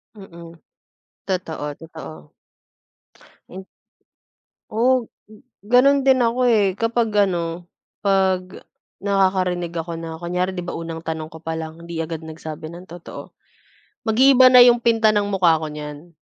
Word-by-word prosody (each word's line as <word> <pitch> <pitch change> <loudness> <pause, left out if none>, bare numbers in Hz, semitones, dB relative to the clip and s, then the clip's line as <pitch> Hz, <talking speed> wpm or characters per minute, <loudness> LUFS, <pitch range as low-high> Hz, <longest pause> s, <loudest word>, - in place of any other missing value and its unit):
Mm, 170 -4 -12 0.7
totoo, 160 -6 -4
totoo. 155 - -12 1.2
Hin 190 +1 -9 1.1
Oo, 240 +2 +1 0.5
gano'n 255 +6 +4
din 265 -1 +4
ako 235 +2 0
eh 205 -5 +3
kapag 230 +2 0 0.2
ano, 170 -1 -4 0.3
'pag 190 -2 0 0.4
nakakarinig 185 -3 0
ako 170 0 -4
na 165 -1 -7
kunyari, 180 +2 -2
'di 180 - -4
ba, - - -5
unang 165 -1 -6
tanong 160 -1 -5
ko 160 - -11
pa 165 0 -4
lang 160 +1 -8
hindi 170 -1 -6
agad 165 0 -6
nagsabi 155 -1 -8
ng 175 +2 -11
totoo, 175 0 -10 0.8
mag-iiba 255 +3 +6
na 250 -1 +9
yung 240 -1 +6
pinta 225 -2 +3
ng 205 -1 +1
mukha 180 -5 +3
ko 155 - -3
niyan. 150 +2 -9
180 Hz, 135 wpm, -21 LUFS, 165-220 Hz, 1.2 s, na